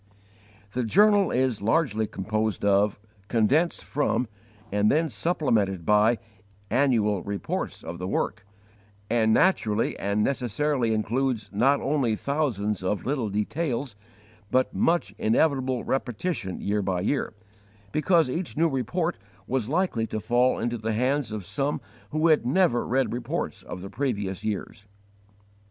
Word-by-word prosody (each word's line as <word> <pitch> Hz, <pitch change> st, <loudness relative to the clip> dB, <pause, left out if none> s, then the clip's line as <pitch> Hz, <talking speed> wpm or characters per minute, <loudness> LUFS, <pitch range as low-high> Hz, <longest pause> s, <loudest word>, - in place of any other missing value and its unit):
The 125 Hz, -, 0 dB
journal 205 Hz, -, +4 dB
is 125 Hz, -4 st, 0 dB
largely 110 Hz, -1 st, +1 dB
composed 110 Hz, +1 st, -2 dB
of, 100 Hz, +1 st, +3 dB, 0.3 s
condensed 130 Hz, +10 st, +2 dB
from, 140 Hz, -3 st, 0 dB, 0.4 s
and 105 Hz, +1 st, +3 dB
then 160 Hz, +2 st, +2 dB
supplemented 105 Hz, -, 0 dB
by, 105 Hz, +3 st, +4 dB, 0.5 s
annual 115 Hz, -6 st, +2 dB
reports 100 Hz, +1 st, -4 dB
of 85 Hz, +1 st, -7 dB
the 90 Hz, -, -3 dB
work, 100 Hz, +2 st, -2 dB, 0.7 s
and 110 Hz, -2 st, +3 dB
naturally 115 Hz, -, +2 dB
and 100 Hz, +1 st, 0 dB
necessarily 130 Hz, 0 st, 0 dB
includes, 110 Hz, 0 st, -1 dB
not 135 Hz, +7 st, +3 dB
only 135 Hz, -6 st, +1 dB
thousands 110 Hz, -9 st, -1 dB
of 95 Hz, +2 st, -2 dB
little 130 Hz, -5 st, -1 dB
details, 125 Hz, +3 st, -2 dB, 0.5 s
but 130 Hz, +4 st, +1 dB
much 170 Hz, +1 st, +1 dB
inevitable 130 Hz, +1 st, +1 dB
repetition 125 Hz, -, -2 dB
year 105 Hz, +1 st, 0 dB
by 95 Hz, -2 st, -1 dB
year, 115 Hz, +2 st, -1 dB, 0.6 s
because 160 Hz, +1 st, +3 dB
each 165 Hz, +5 st, -4 dB
new 165 Hz, +1 st, +3 dB
report 165 Hz, +6 st, -1 dB, 0.3 s
was 125 Hz, 0 st, -1 dB
likely 155 Hz, -9 st, 0 dB
to 110 Hz, -, -3 dB
fall 125 Hz, +4 st, +2 dB
into 120 Hz, 0 st, -2 dB
the 110 Hz, +1 st, -2 dB
hands 125 Hz, +1 st, 0 dB
of 105 Hz, -4 st, -5 dB
some 140 Hz, +8 st, -1 dB, 0.3 s
who 155 Hz, +2 st, +2 dB
had 155 Hz, -, +4 dB
never 135 Hz, -1 st, +2 dB
read 130 Hz, -1 st, +1 dB
reports 120 Hz, -1 st, -3 dB
of 90 Hz, -, -8 dB
the 100 Hz, -, -7 dB
previous 100 Hz, -9 st, -2 dB
years. 105 Hz, -1 st, -4 dB
120 Hz, 135 wpm, -26 LUFS, 105-145 Hz, 0.7 s, journal